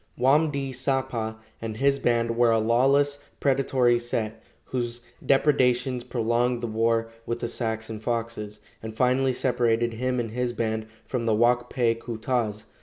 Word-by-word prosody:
Wam 150 +5 +4
di 140 -2 -3
sapa 125 -4 -1 0.2
and 110 -1 -5
his 140 +2 +2
band 115 -2 +1
were 120 0 +4
a 115 - +4
lawless, 135 +6 +3 0.2
predatory 130 -3 +2
set, 115 -2 -3 0.2
whose 120 -1 -3 0.2
depredations 130 -3 +2
prolonged 120 0 0
the 120 - -3
war 115 0 +1 0.2
with 120 0 -2
the 120 - -2
Sacs 110 -1 -2
and 110 -1 -6
Foxes, 115 -2 -3 0.2
and 110 0 -8
finally 130 +2 +3
separated 120 -2 +1
him 125 +2 -1
and 115 -2 -3
his 125 +1 -1
band 110 -1 -2 0.2
from 120 -3 -3
the 110 - +3
Wak 120 +2 +2
pe 120 -3 +2
ku 115 0 -7
tas. 110 -3 -1
120 Hz, 160 wpm, -26 LUFS, 115-130 Hz, 0.2 s, Wam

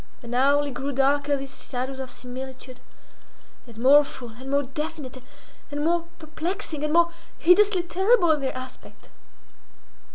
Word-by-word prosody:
And 235 0 -7
hourly 280 +3 +3
grew 275 +2 -4
darker 280 +2 +2
these 275 0 -7
shadows 260 +1 -4
of 260 -1 -5
similitude, 255 0 -8 0.9
and 230 -2 -14
more 275 +5 +7
full, 255 -3 -9
and 250 +4 -10
more 280 +1 +2
definite, 285 -1 -6 0.5
and 290 0 -3
more 340 0 +1
perplexing, 315 0 -4
and 300 - 0
more 340 +1 +4 0.3
hideously 375 +1 +4
terrible 370 +1 +3
in 300 -2 +1
their 265 -1 -3
aspect. 255 0 -11
285 Hz, 140 wpm, -25 LUFS, 260-320 Hz, 0.9 s, more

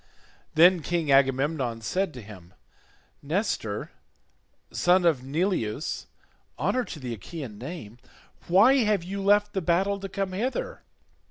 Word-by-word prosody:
Then 175 +2 +6
King 165 -2 -1
Agamemnon 135 -2 +2
said 185 - -1
to 125 - -8
him, 95 -4 -13 0.7
"Nestor 150 - -2 0.8
son 180 0 +3
of 155 -7 +3
Neleus, 150 - -2 0.5
honour 255 -1 0
to 155 - -8
the 125 -3 -5
Achaean 115 - -8
name, 125 -5 -8 0.5
why 205 +10 +6
have 210 -7 +2
you 195 +3 -5
left 205 +1 +3
the 190 - -1
battle 190 +4 +1
to 195 0 -6
come 195 0 -3
hither? 230 +8 -3
170 Hz, 125 wpm, -26 LUFS, 130-195 Hz, 0.8 s, Then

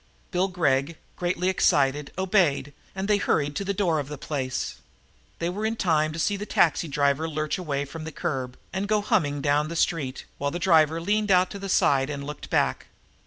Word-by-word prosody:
Bill 185 0 +1
Gregg, 160 -4 0 0.2
greatly 180 0 -1
excited, 145 -6 +2
obeyed, 180 -7 +2 0.2
and 190 +1 -3
they 210 -1 +4
hurried 145 -6 0
to - - -1
the 200 - -1
door 180 -5 +1
of 140 - -4
the 150 0 -6
place. 130 -3 -3 0.6
They 170 - -2
were 195 +5 -3
in 220 +1 0
time 155 -7 +1
to 155 - -7
see 200 +5 +1
the 205 +1 -6
taxicab 145 -3 +2
lurch 155 +1 -2
away 145 -5 -2
from 155 +3 -8
the 160 - -5
curb 135 -6 -3 0.2
and 195 +2 -2
go 210 0 +2
humming 150 -10 +1
down 145 +1 +2
the 170 - -5
street, 150 -6 -1
while 140 - 0
the 170 - -4
driver 165 -3 +4
leaned 210 +4 0
out 185 -1 +4
to 200 - -6
the 195 0 -5
side 135 -6 +3
and 140 -1 -4
looked 150 +1 -7
back. - - +1
160 Hz, 200 wpm, -26 LUFS, 145-190 Hz, 0.6 s, they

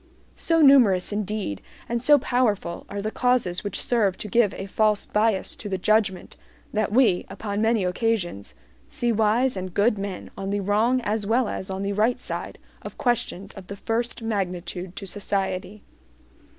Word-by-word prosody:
So 330 -1 +2
numerous 235 -11 +6
indeed 205 - -3 0.3
and 235 0 -1
so 290 +4 +6
powerful 230 -10 -1
are 200 0 -4
the 215 - -2
causes 245 -9 +1
which 205 - -3
serve 210 -6 +1
to - - -5
give 215 -1 +3
a 195 - -5
false 210 +1 +1
bias 210 -2 0
to 210 - -6
the 190 - -1
judgment, 205 -1 0 0.4
that 215 -1 0
we, 215 -6 +3
upon 205 -1 -4
many 225 -2 +2
occasions, 180 - -1 0.3
see 240 -1 0
wise 225 +4 +2
and 185 -1 -6
good 210 0 +3
men 195 -2 -5
on 195 0 -5
the 200 0 -1
wrong 220 +6 +2
as 210 -2 -2
well 235 +2 +2
as 190 - -5
on 190 +1 -3
the 200 0 -1
right 225 +5 +1
side - - -5 0.2
of - - -9
questions 205 -6 -1
of 190 -2 -11
the 200 - -6
first 230 +3 -2
magnitude 180 -4 -3
to 200 - -6
society. 195 +1 -3
210 Hz, 170 wpm, -24 LUFS, 190-230 Hz, 0.4 s, numerous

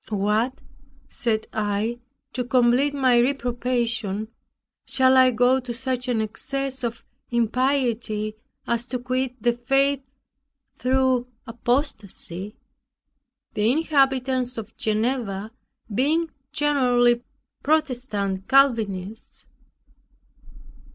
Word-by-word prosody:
"What," 215 +5 0 0.5
said 220 -2 -1
I, 215 +3 -1 0.3
"to 250 - -1
complete 250 +3 +3
my 255 -3 +4
reprobation, 240 -4 0 0.5
shall 260 -1 +3
I 260 0 +7
go 250 +2 +3
to 245 -2 -6
such 255 0 -3
an 235 -3 +1
excess 265 +4 -4
of 235 -1 -4 0.2
impiety, 235 -3 0 0.3
as 235 +1 -1
to 255 - -2
quit 255 +1 -2
the 240 0 +3
faith 270 +3 +1 0.7
through 260 -1 +1 0.2
apostacy? 220 - -2 1.0
(The 215 +2 +2
inhabitants 265 -4 +1
of 225 0 -7
Geneva 220 -2 -1 0.4
being 310 +8 +1 0.2
generally 245 -5 +3 0.4
Protestant 245 -11 -1
Calvinists.) 225 -7 +1
245 Hz, 90 wpm, -24 LUFS, 220-265 Hz, 1.0 s, I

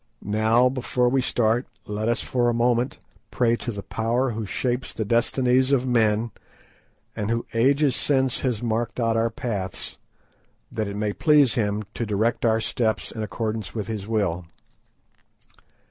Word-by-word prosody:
Now 110 +4 +3
before 125 -1 0
we 135 +1 +2
start 120 0 +1 0.2
let 105 +2 -2
us 120 - +1
for 120 -1 +1
a 120 - 0
moment 120 +1 +1 0.3
pray 120 -2 +2
to 120 - -4
the 100 -2 -6
Power 120 +3 0
who 110 -2 -4
shapes 125 +4 -2
the 110 - -3
destinies 125 +4 +2
of 130 -2 +3
men, 115 -2 +2 0.8
and 105 0 -2
who 115 0 -1
ages 135 +3 +3
since 130 -3 +1
has 125 -4 -1
marked 115 +1 -1
out 115 -1 +1
our 115 +1 +2
paths, 100 -5 -4 0.7
that 110 -2 -2
it 100 - -5
may 105 0 -1
please 150 -3 +4
Him 105 -2 0
to - - -3
direct 110 +4 0
our 110 -1 +3
steps 110 -1 -1
in 110 - -6
accordance 110 -1 -3
with 105 -3 -2
His 105 -3 -5
will." 95 -6 -1
115 Hz, 160 wpm, -24 LUFS, 110-125 Hz, 0.8 s, please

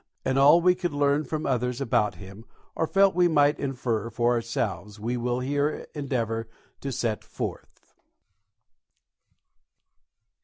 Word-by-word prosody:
And 130 - +1
all 145 +5 +7
we 180 +1 +5
could 180 -3 -3
learn 145 +1 +2
from 155 -1 -3
others 125 -1 -1
about 120 -8 +1
him 95 +4 -11 0.3
or 160 - -1
felt 195 +2 +4
we 175 +1 +4
might 145 -3 +3
infer 120 -5 -2
for 120 +1 +1
ourselves 105 -4 -3
we 115 +4 -2
will 125 +1 -1
here 145 +3 -1
endeavour 115 -6 -2 0.3
to 140 - -4
set 115 -4 -2
forth. - - -7
125 Hz, 130 wpm, -26 LUFS, 115-145 Hz, 0.3 s, all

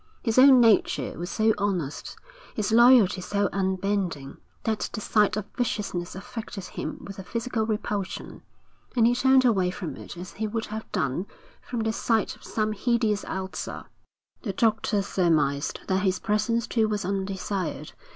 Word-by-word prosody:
His 230 0 +2
own 265 -1 +8
nature 225 -4 +3
was 175 +1 -5
so 220 0 +2
honest, 180 -8 -2 0.4
his 215 -1 -1
loyalty 235 -5 +6
so 200 +2 0
unbending, 190 -6 -1 0.3
that 220 -1 -1
the - - -3
sight 210 0 +2
of 210 - -3
viciousness 200 -7 -2
affected 220 -2 -7
him - - -5
with 195 -1 -8
a - - -6
physical 230 +2 -2
repulsion, 210 -3 -3 0.5
and 235 -2 +4
he 240 - +5
turned 265 +1 +4
away 195 -7 +3
from 180 -2 -5
it - - -10
as 180 +1 -7
he 220 +1 -3
would 225 +1 -3
have 220 +1 -7
done 140 +9 -1 0.3
from 240 -2 -4
the 220 0 0
sight 225 -1 0
of - - -21
some 215 -1 -1
hideous 220 -1 +1
ulcer. 190 0 -5 0.6
The 205 -6 -3
doctor 215 -1 +1
surmised 155 -7 +1
that 190 -1 +1
his 190 -2 +1
presence 220 +2 0
too 220 -2 +1
was 210 -3 -2
undesired. 190 0 -3
210 Hz, 160 wpm, -26 LUFS, 190-225 Hz, 0.6 s, own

